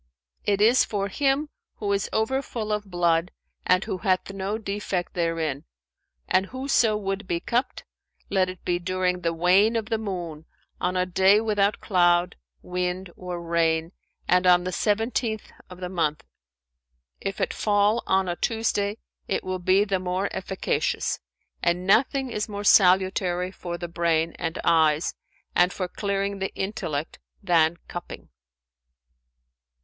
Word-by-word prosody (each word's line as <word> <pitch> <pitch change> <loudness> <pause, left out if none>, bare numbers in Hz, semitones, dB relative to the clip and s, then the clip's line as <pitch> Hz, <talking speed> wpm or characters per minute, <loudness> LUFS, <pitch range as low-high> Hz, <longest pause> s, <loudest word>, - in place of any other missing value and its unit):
"It 200 0 +1
is 235 +4 +6
for 200 -1 -2
him 280 +6 +1 0.3
who 205 -2 -2
is 200 -1 -1
over 245 +5 +1
full 220 -5 -5
of 210 -1 -3
blood 170 -1 +2 0.4
and 185 +1 +4
who 185 - -4
hath 185 +1 0
no 195 +2 -2
defect 200 -4 -3
therein; 165 -4 -1 0.6
and 190 +1 +2
whoso 255 -4 +1
would 195 -1 -3
be 170 -2 0
cupped, 240 +8 -1 0.4
let 190 -2 +1
it 185 -1 -10
be 175 -1 +1
during 180 0 -1
the 165 - 0
wane 185 +7 +4
of 225 0 -2
the 225 -1 0
moon, 175 -7 -5 0.3
on 180 +1 0
a 180 - +2
day 190 +3 +4
without 210 -2 +1
cloud, 175 -2 +3 0.3
wind 180 0 -3
or 180 -1 -5
rain 165 -1 +1 0.4
and 180 0 +3
on 180 0 +6
the 185 - -3
seventeenth 220 +3 -1 0.2
of 180 -1 -11
the 180 - -4
month. 165 -5 -1 1.0
If 195 - -4
it - - 0
fall 210 +2 +2
on 190 0 +2
a 175 - -1
Tuesday, 215 -1 -1 0.3
it - - -1
will 185 0 -3
be 185 +3 +4
the 195 -2 0
more 185 +2 -1
efficacious, 190 0 -1 0.4
and 175 +1 +1
nothing 255 +6 +2
is 210 0 -2
more 205 0 -5
salutary 185 -2 +4
for 175 -2 -6
the 175 - -5
brain 165 -1 +1
and 165 -1 -3
eyes 160 -1 +3 0.4
and 180 +1 +4
for 185 0 -3
clearing 200 +1 -2
the 195 - -2
intellect 165 -7 -3 0.2
than 170 -3 +3
cupping." 175 0 -8
185 Hz, 150 wpm, -25 LUFS, 175-205 Hz, 1.0 s, is